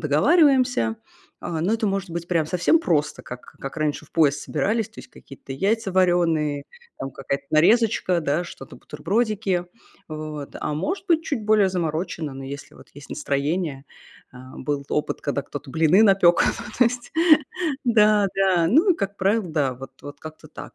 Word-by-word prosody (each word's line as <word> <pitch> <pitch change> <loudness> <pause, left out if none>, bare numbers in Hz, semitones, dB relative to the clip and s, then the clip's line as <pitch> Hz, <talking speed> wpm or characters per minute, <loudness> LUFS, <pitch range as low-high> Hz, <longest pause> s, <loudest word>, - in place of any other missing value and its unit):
договариваемся. 250 - +3 0.5
А, 165 -2 -3
но 195 - +1
это 225 -1 0
может 195 -2 -2
быть 170 +1 -5
прям 165 -3 +1
совсем 180 - +2
просто, 155 - 0
как 125 0 -8 0.2
как 135 - -7
раньше 150 -1 -1
в - - -24
поезд 150 -3 +3
собирались: 210 +9 -1
то 220 - -18
есть - - -15
какие-то 135 0 -12
яйца 200 +7 0
вареные, 165 -6 +1 0.3
там 135 - -5
какая-то 140 +1 -4
нарезочка, 185 +1 +3
да, 155 +3 -1
что-то 135 -6 -11
бутербродики. 200 -2 -1 0.4
Вот, 155 -2 -7
а 150 - -2
может 370 - -3
быть 330 -2 +2
чуть 250 -8 -3
более 210 -3 +4
заморочено, 165 -3 -3
но 135 - -8
если 140 +2 -8
вот - - -16
есть 145 0 -12
настроение. 140 0 -2 0.5
А, 130 +1 -12
был 140 0 -3
опыт, 150 - -2
когда 140 -1 -2
кто-то 145 0 -9
блины 165 +7 +4
напёк, 190 -4 +5 0.4
то 245 - +6
есть, 240 +1 -2 0.7
да-да. 200 -6 +3
Ну 320 - +4
и - - -6
как 200 0 -3
правило, 200 +1 +1
да, 145 -5 0
вот 135 +1 -11
вот 145 0 -10
как-то 155 0 -11
так. - - -11
170 Hz, 165 wpm, -23 LUFS, 145-210 Hz, 0.7 s, то